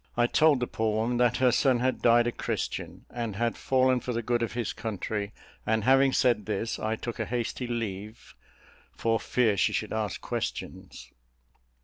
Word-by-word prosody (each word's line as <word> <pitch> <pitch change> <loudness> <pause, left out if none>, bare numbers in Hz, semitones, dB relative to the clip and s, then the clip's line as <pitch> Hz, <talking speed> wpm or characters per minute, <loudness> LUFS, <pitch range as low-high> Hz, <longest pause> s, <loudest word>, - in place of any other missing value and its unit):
I 120 - +4
told 150 +2 +4
the 125 - 0
poor 110 -2 -1
woman 115 +3 0
that 120 0 +3
her 130 -1 +4
son 130 0 +3
had 130 +1 0
died 120 0 +5
a 120 - 0
Christian, - - -4
and 115 -4 -4
had 115 +2 0
fallen 130 -1 +2
for 125 - -4
the 115 0 -2
good 120 +1 0
of 115 - -2
his 120 -3 -2
country; 105 -1 -4 0.3
and 110 -1 0
having 135 +2 +5
said 120 -6 +2
this, 110 +2 -2
I 110 +1 -1
took 120 +1 -6
a - - -1
hasty 120 +1 -3
leave, 110 -2 -5 0.6
for 115 -1 +1
fear 115 -5 +1
she - - +2
should - - -2
ask - - -2
questions. - - -5
120 Hz, 180 wpm, -28 LUFS, 110-125 Hz, 0.6 s, died